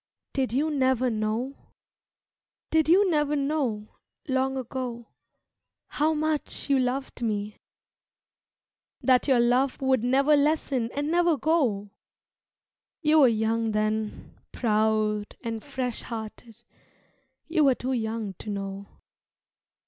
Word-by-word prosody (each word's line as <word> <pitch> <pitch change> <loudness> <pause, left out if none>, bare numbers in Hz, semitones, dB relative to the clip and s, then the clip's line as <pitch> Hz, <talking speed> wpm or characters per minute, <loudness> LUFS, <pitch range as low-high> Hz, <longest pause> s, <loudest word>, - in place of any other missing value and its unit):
"Did 265 -3 0
You 295 +6 +1
Never 260 -3 +2
Know?" 220 +4 -2 1.2
Did 320 -1 +3
you 385 +4 +6
never 295 -1 +1
know, 275 -7 -2 0.3
long 265 0 0
ago, 245 -2 -5 0.8
how 310 +2 +1
much 305 -1 -2
you 275 - +4
loved 255 +1 -2
me 210 -2 -2 1.4
That 255 0 +3
your 260 -3 +4
love 250 +3 +2
would 265 -3 +1
never 275 +4 +4
lessen 285 -5 +1
and 290 +2 -1
never 345 -2 +3
go? 245 -11 0 1.1
You 310 +1 +5
were 275 - +7
young 225 0 0
then, 215 0 -2 0.2
proud 215 -2 0
and 225 -2 -4
fresh 255 -4 -3
hearted, 225 0 -8 0.8
You 325 -2 +2
were 265 -2 +4
too 260 +2 -3
young 220 -3 -3
to - - -7
know. 195 0 -5
255 Hz, 115 wpm, -26 LUFS, 220-285 Hz, 1.4 s, were